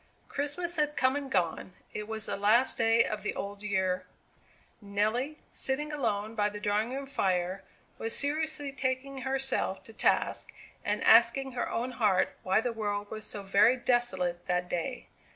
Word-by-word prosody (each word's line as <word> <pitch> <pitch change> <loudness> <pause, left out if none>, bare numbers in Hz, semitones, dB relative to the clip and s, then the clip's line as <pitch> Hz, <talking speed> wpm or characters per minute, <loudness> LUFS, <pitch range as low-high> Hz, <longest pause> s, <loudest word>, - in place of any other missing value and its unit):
Christmas 340 +5 -1
had 300 -1 +1
come 260 +1 +3
and 285 -1 -3
gone. 180 -3 -1 0.2
It 210 0 -5
was 220 -1 -3
the - - -2
last 215 +6 +3
day 225 0 +4
of 215 -1 -3
the 210 - -3
old 200 0 -5
year; 185 -3 0 0.7
Nelly, 215 +8 -1 0.2
sitting 295 +3 -1
alone 220 -6 -1
by 210 -2 +1
the 210 0 -7
drawing 210 +3 0
room 275 +1 -4
fire, 190 -7 0 0.4
was 225 0 0
seriously 300 0 -1
taking 265 0 -2
herself 265 -6 0
to 225 - -12
task, - - +1 0.3
and - - -1
asking 270 -1 +5
her 245 - -2
own 245 +2 -2
heart 210 -6 +2
why 190 +4 +2
the 240 0 -2
world 205 -2 -3
was 215 -1 -6
so 205 -1 -6
very 200 +6 +5
desolate 190 -9 0
that 180 0 0
day? 210 +9 -3
225 Hz, 165 wpm, -30 LUFS, 200-265 Hz, 0.7 s, asking